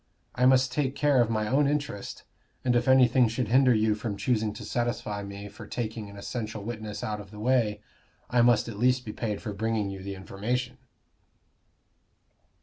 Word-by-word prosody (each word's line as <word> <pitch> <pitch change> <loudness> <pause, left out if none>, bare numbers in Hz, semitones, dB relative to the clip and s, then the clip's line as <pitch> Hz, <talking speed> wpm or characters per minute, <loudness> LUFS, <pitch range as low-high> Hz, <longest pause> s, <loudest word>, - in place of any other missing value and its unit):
I 125 0 +3
must 130 -1 +4
take 135 0 -1
care 145 -4 +3
of 115 - +1
my 110 -2 0
own 140 +5 +3
interest, 140 -8 -3 0.4
and 125 -1 +3
if 120 - +1
anything 130 -1 +5
should 115 0 -2
hinder 130 +1 +5
you 110 0 +3
from 105 -1 -4
choosing 110 -3 0
to - - -8
satisfy 120 -4 -2
me 100 0 -7
for 105 +1 -11
taking 110 -3 -4
an 100 - -11
essential 110 0 -5
witness 110 -2 -5
out 105 -1 -3
of 100 - -13
the 105 - -12
way, 110 -3 +1 0.5
I 120 -1 +3
must 120 -1 +4
at 110 -3 -7
least 125 +1 +2
be 105 - -5
paid 105 -3 -3
for 105 - -4
bringing 110 -1 -1
you 95 -1 -7
the 100 +1 -5
information." 120 +7 -3
115 Hz, 185 wpm, -28 LUFS, 105-125 Hz, 0.5 s, anything